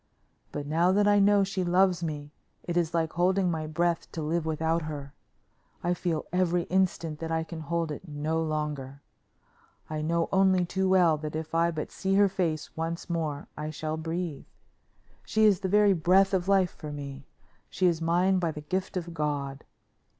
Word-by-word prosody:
But 145 - -4
now 165 +5 +2
that 205 +1 +3
I 205 0 +5
know 200 0 +5
she 195 -1 -2
loves 180 0 +3
me 150 -2 -4 0.3
it 175 - -4
is 170 -2 +1
like 165 -2 0
holding 180 +1 +2
my 155 -2 -3
breath 170 +2 -1
to 160 - -4
live 160 +1 -1
without 160 +1 0
her. 145 -3 -6 0.7
I 175 - +2
feel 170 -3 -2
every 180 -1 +2
instant 170 -5 +1
that 165 0 -4
I 160 0 0
can 165 0 -8
hold 165 0 -2
it 150 +5 -7
no 155 +2 -1
longer. 150 -3 -3 0.9
I 155 0 -2
know 165 +2 0
only 190 -2 +4
too 190 +2 0
well 175 -4 +4
that 150 0 -6
if 160 0 -5
I 165 +1 +3
but 155 -3 -4
see 195 0 -1
her 200 0 +6
face 170 -5 -2
once 165 +2 -4
more 155 -4 -2
I 150 0 -4
shall 155 0 -3
breathe. 160 -1 -4 0.8
She 220 0 +2
is 205 -4 +5
the 190 -2 -2
very 205 0 +5
breath 190 +3 +4
of 185 -1 +1
life 195 -3 +3
for 150 - -8
me. 140 -1 -7 0.4
She 185 - 0
is 170 -2 +2
mine 180 +3 +2
by 170 -2 0
the 150 -1 -6
gift 185 +5 -3
of 170 -1 -5
God. 145 -3 -3
165 Hz, 185 wpm, -28 LUFS, 155-185 Hz, 0.9 s, her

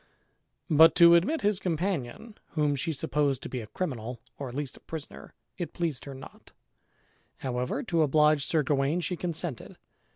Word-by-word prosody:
But 160 +1 +6
to 170 -1 +8
admit 200 - +3
his 205 -2 +1
companion, 180 - -3 0.2
whom 150 -2 +1
she 140 +4 -2
supposed 140 -2 0
to - - -6
be 125 - -4
a 110 - -9
criminal, 125 - -4 0.2
or 140 -2 -4
at 120 - -9
least 145 -2 -3
a - - -11
prisoner, 160 -2 -8 0.2
it 175 - -4
pleased 165 -6 -2
her 140 -1 -8
not; 130 - -13 0.8
however, 125 - -2
to 170 -9 +1
oblige 150 0 +4
Sir 155 +1 +1
Gawain, 140 +4 +1
she 180 - -2
consented. 170 - -5
150 Hz, 165 wpm, -28 LUFS, 135-170 Hz, 0.8 s, to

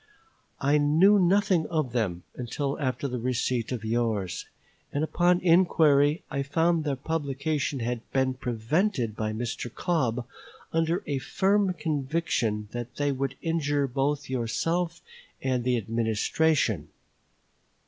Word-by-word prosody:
I 145 +2 +3
knew 165 +8 +5
nothing 185 -2 +3
of 155 -7 -1
them 100 -8 -1
until 135 +4 -3
after 135 0 -1
the 125 -2 -3
receipt 125 0 -1
of 115 -4 -4
yours; 110 -6 -1 0.4
and 145 - -1
upon 175 +2 +3
inquiry 160 -4 +4
I 140 - -1
found 160 +4 +1
their 140 -2 0
publication 140 -1 -2
had 120 0 -2
been 130 -1 +1
prevented 125 - -1
by 110 -1 -2
Mr. 120 +1 -4
Cobb 125 -8 -1 0.5
under 165 +2 +1
a 140 -2 -1
firm 195 +5 +1
conviction 140 -8 -1
that 120 0 -6
they 145 0 0
would 135 0 -2
injure 145 -4 +1
both 140 +2 -1
yourself 165 +8 -1 0.4
and 130 -2 -1
the 125 0 +2
Administration. 115 - +1
140 Hz, 125 wpm, -27 LUFS, 120-160 Hz, 0.5 s, knew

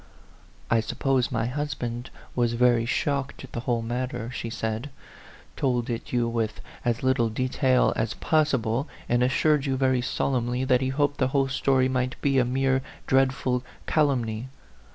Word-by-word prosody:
" - - -22
I 115 - +5
suppose 130 +2 0
my 115 -2 0
husband 125 -3 -3 0.3
was 120 -1 +2
very 120 -1 +3
shocked 140 +2 -1
at 130 - -11
the - - -4
whole 120 -1 -1
matter," 120 0 -3
she 115 -2 -4
said 110 +3 -3 0.3
" - - -22
told 125 -2 0
it 115 - -5
you 120 -1 +1
with 115 -2 -2 0.2
as 120 0 0
little 130 -3 +2
detail 130 +2 +2
as 110 - -1
possible, 135 -4 +1 0.2
and 120 0 +2
assured 140 +3 +2
you 135 -1 0
very 130 -1 +2
solemnly 125 0 -1
that 130 -1 +3
he 130 - 0
hoped 145 +1 0
the 130 - +3
whole 135 -1 +2
story 130 -1 +2
might 130 0 -1
be 135 -2 +2
a 125 - +3
mere 130 +1 +1 0.2
dreadful 130 -1 +2 0.2
calumny? 125 -6 +1
125 Hz, 165 wpm, -26 LUFS, 120-135 Hz, 0.3 s, I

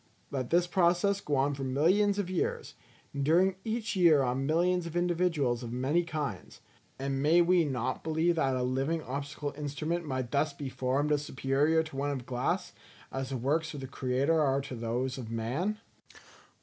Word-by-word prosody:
Let 130 -3 -3
this 175 +1 +3
process 180 +3 +2
go 150 - -1
on 140 +2 +2
for 140 -1 -5
millions 180 +10 +2
of 200 -3 -1
years; 185 -1 -2 0.4
and 140 -1 -2
during 180 +6 +3
each 230 0 -2
year 165 -6 +5
on 130 +2 -1
millions 175 +2 +2
of 170 - -8
individuals 170 -8 +1
of 120 -2 -6
many 135 +8 +1
kinds; 150 - -5 0.4
and 135 0 -2
may 160 +4 +5
we 175 -1 +4
not 130 -2 -2
believe 160 +2 +1
that 135 -4 +2
a 125 - 0
living 135 +6 -1
optical 145 +2 -4
instrument 155 +4 -3
might 130 -5 -3
thus 145 +1 +1
be 140 -1 -5
formed 135 +4 0
as 145 -1 +2
superior 145 +4 +1
to 160 -3 -10
one 140 +1 -1
of 135 -4 -4
glass, 155 +10 -2 0.4
as 135 -1 -3
the 135 - -2
works 155 +6 -1
of - - -5
the - - -5
Creator 135 +5 +1
are 135 -1 +2
to 135 -1 -8
those 125 +3 -2
of 115 -3 -7
man? 130 - -2
145 Hz, 185 wpm, -30 LUFS, 130-170 Hz, 0.4 s, year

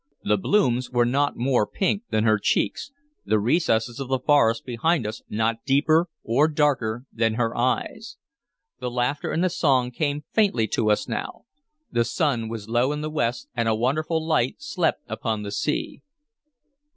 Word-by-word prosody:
The 105 - +2
blooms 125 - +1
were 120 -1 +2
not 140 +4 +1
more 120 -3 +1
pink 200 +1 0
than 110 - +1
her 110 -1 +3
cheeks, 275 - 0 0.3
the 110 - +2
recesses 115 - +1
of 135 - -4
the 130 0 +1
forest 125 -5 +2
behind 130 +3 0
us 110 +1 -5
not 115 +1 -1
deeper 155 +5 +3
or 135 +7 +3
darker 135 -6 0
than 115 -1 +1
her 115 -1 -1
eyes. 130 - -2 0.6
The 125 -1 -3
laughter 125 +4 -1
and 170 - 0
the 185 - +3
song 130 -7 +2
came 145 +2 -2
faintly 195 - +2
to 110 - +1
us 105 - +1
now. - - -5 0.5
The 120 - +2
sun 120 -6 -1
was 110 -2 -6
low 120 +4 +1
in 150 0 -3
the 155 0 -4
west, 120 -5 -1
and 115 -2 0
a 110 - +2
wonderful 155 +7 0
light 130 -6 +1
slept 200 - -1
upon 110 -3 -3
the 100 - -5
sea. 150 +8 -2
125 Hz, 170 wpm, -24 LUFS, 115-150 Hz, 0.6 s, her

